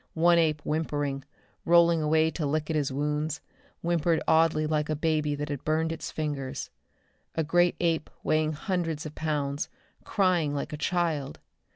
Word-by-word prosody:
One 170 +1 +5
ape 155 -3 +2
whimpering, 145 -3 -2 0.4
rolling 170 -1 +5
away 160 +1 +3
to 160 - -4
lick 155 +2 -1
at - - -1
his 145 -3 0
wounds; 150 +2 -1 0.4
whimpering 170 -1 +1
oddly 160 -1 +4
like 150 0 0
a 155 - +1
baby 150 -1 0
that 145 +1 -4
has 145 -2 -3
burned 160 +3 0
its 165 - -5
fingers. 145 -4 -4 0.6
A 160 - +1
great 175 +3 +3
ape 165 -2 0
weighing 155 0 +1
hundreds 165 -2 -2
of 150 - -6
pounds, 145 -2 -2 0.3
crying 180 -7 +1
like 145 - -4
a - - -1
child! 160 -4 -1
155 Hz, 160 wpm, -28 LUFS, 150-165 Hz, 0.6 s, One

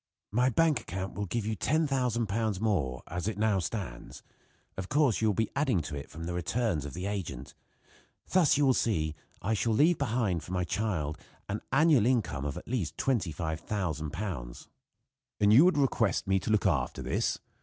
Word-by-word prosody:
"My 125 +4 +3
bank 155 +1 +2
account 95 0 -5
will 100 +2 -3
give 110 +4 -2
you 110 0 -1
£10,000 120 - 0
more, 85 - 0
as 90 +3 -4
it 110 - -2
now 105 -2 +2
stands. 85 - -5 0.5
Of 95 0 -5
course 140 -6 +2
you 110 - +3
will 105 - +2
be 110 +2 0
adding 135 -9 +2
to 75 -1 -6
it 70 - -7
from 80 - -8
the 85 +1 -3
returns 90 - -1
of 70 - -7
the 90 +2 -4
agent. 85 -11 -4 0.7
Thus 180 -6 +4
you 145 - +3
will 130 - +5
see, 80 -11 0 0.3
I 110 - +1
shall 110 +2 +1
leave 155 +8 +4
behind 110 - 0
for 90 - -7
my 90 -1 +1
child 85 -7 -2 0.3
an 100 +2 -3
annual 140 -5 +5
income 105 - 0
of 75 +3 -3
at - - -9
least 115 - -2
£25,000." 80 - -3 0.7
"And 105 0 +5
you 135 +9 +8
would 185 -4 +4
request 125 -8 +1
me 95 -1 +2
to - - -5
look 110 -1 +2
after 75 -10 0
this?" - - 0
105 Hz, 180 wpm, -30 LUFS, 85-120 Hz, 0.7 s, you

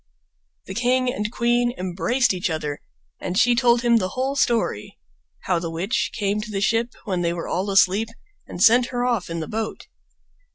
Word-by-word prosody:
The 190 - -7
king 250 +3 +1
and 210 +1 -3
queen 240 0 +1
embraced 195 +8 0
each 185 +1 -2
other, 150 -3 -3 0.4
and 180 - -3
she 245 +2 +5
told 240 0 +3
him 235 -1 +4
the 185 -4 -1
whole 265 +2 0
story—how 105 - -2
the 165 0 -4
witch 180 +9 -1
came 205 0 0
to 215 - -7
the 200 -2 -2
ship 230 +4 0
when 185 -2 -1
they 170 -1 0
were 170 -1 -5
all 190 +4 -2
asleep 195 +3 +3 0.4
and 180 - -2
sent 240 +2 +6
her 245 -1 -2
off 235 -8 -1
in 165 0 -3
the 160 - -5
boat. 220 0 -4
210 Hz, 180 wpm, -23 LUFS, 180-240 Hz, 0.4 s, sent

